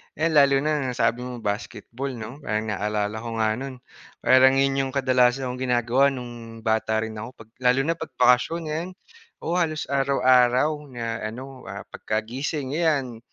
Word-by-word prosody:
ayan 160 +2 +1
lalo 140 -2 +5
na 155 0 +1
nasabi 125 0 0
mo 120 -2 -7
basketball 115 +5 -4
'no, 120 +5 -8
parang 110 -4 -2
naalala 105 +1 -2
ko 115 +1 -6
nga 110 -1 +2
no'n 135 -1 -6 0.5
parang 130 +1 +6
'yun 135 0 +2
'yung - - -6
kadalasan 130 -1 +2
kong 125 - -7
ginagawa 125 +1 +2
no'ng 120 -4 -7
bata 110 0 +1
rin 110 -1 -6
ako, 115 +4 -8
pag 110 - -28
lalo 125 +1 +3
na 165 +3 -1
pag - - -6
bakasyon, 125 +7 +3
ngayon, 165 +4 -3 0.5
oo, 170 - -1
halos 155 -2 0
araw-araw 130 0 +4 0.2
na 115 -3 -4
ano, 130 +1 -9
ah, 100 +1 -7
pagkagising 130 +6 -3
ayan 145 -7 0
125 Hz, 160 wpm, -24 LUFS, 115-135 Hz, 0.5 s, parang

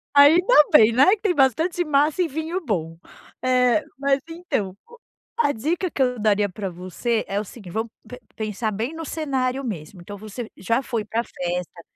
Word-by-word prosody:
Ainda 325 +11 +6 0.2
bem, 230 -6 +7
né. 270 +11 +5
Que 395 - -30
tem 400 -5 +2
bastante 320 +6 +2
massa 300 +3 +2
e 345 - 0
vinho 320 +5 -3
bom. 165 - -2 0.4
Eh, 255 +2 +3 0.2
mas, 275 0 +2
então. 325 - -3
Co 475 0 -17 0.4
a - - +3
dica 330 - -1
que 280 - -7
eu 250 -3 +1
daria 205 -1 +2
pra 195 +1 -5
você 185 +6 -2
é 200 +1 -1
o - - -4
seguint 200 -3 -11
vamos 225 +1 -2 0.2
pe 250 0 -10 0.2
pensar 215 0 -2
bem 225 +9 -3
no 325 0 -6
cenário 270 -4 -2
mesmo. 180 -5 -6
Então 205 +4 -9
você 215 +3 -7
já 230 +7 0
foi 230 -4 -3
pra 225 +2 -2
festa 175 -2 -5
245 Hz, 185 wpm, -23 LUFS, 205-300 Hz, 0.4 s, bem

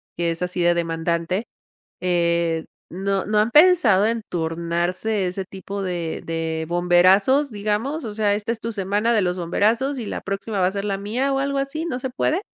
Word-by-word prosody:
que 170 -1 0
es 165 - -5
así 180 0 -2
de 175 0 +4
demandante, 170 +4 -1 0.6
eh, 170 -2 +1 0.3
no 195 +2 -2
no 210 +1 +1
han 215 +2 +3
pensado 295 - +6
en 230 0 -1
turnarse 175 +5 -1
ese 185 +2 -3
tipo 195 +1 -6
de 175 -3 -3
de 160 -1 -2
bomberazos, 185 +11 +4
digamos, 215 +8 -2
o 210 - -5
sea, 205 -1 +2
esta 210 +2 -3
es 230 - -7
tu 230 +1 -4
semana 205 +3 0
de 220 - +3
los 180 0 0
bomberazos 225 +10 +1
y 225 - -5
la - - -4
próxima 195 +1 -3
va 180 - +4
a - - -2
ser 200 +1 -4
la 195 - -1
mía 245 +7 -1
o - - +1
algo 280 0 -1
así, 275 +4 -2
¿no 310 -7 -3
se 260 - -3
puede? 305 +7 0
195 Hz, 195 wpm, -22 LUFS, 175-230 Hz, 0.6 s, pensado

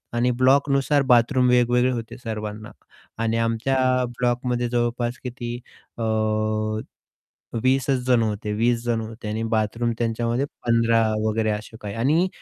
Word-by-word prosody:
आणि 120 +1 +2
ब्लॉकनुसार 140 +2 +3
बाथरूम 125 +2 +4
वेगवेगळे 125 +1 +3
होते 115 -3 -5
सर्वांना. 110 -2 -6 0.5
आणि 115 0 0
आमच्या 115 +3 0 0.4
ब्लॉकमध्ये 120 0 0
जवळपास 120 0 -1
किती 120 -1 -5 0.4
अ, 115 - -3 1.6
20 130 +1 +2
च - - +2 0.2
जण 125 -2 +4
होते. 105 -1 -2
20 115 +2 +1
जण 115 -1 0
होते 110 0 -8
आणि 110 +1 -2
बाथरूम 115 +2 0
त्यांच्यामध्ये 120 +3 0 0.2
15 115 -1 +3 0.2
वगैरे 110 0 0
असे 105 +2 -6
काही 105 0 -6
आणि 150 +10 +2
120 Hz, 130 wpm, -23 LUFS, 115-125 Hz, 1.6 s, बाथरूम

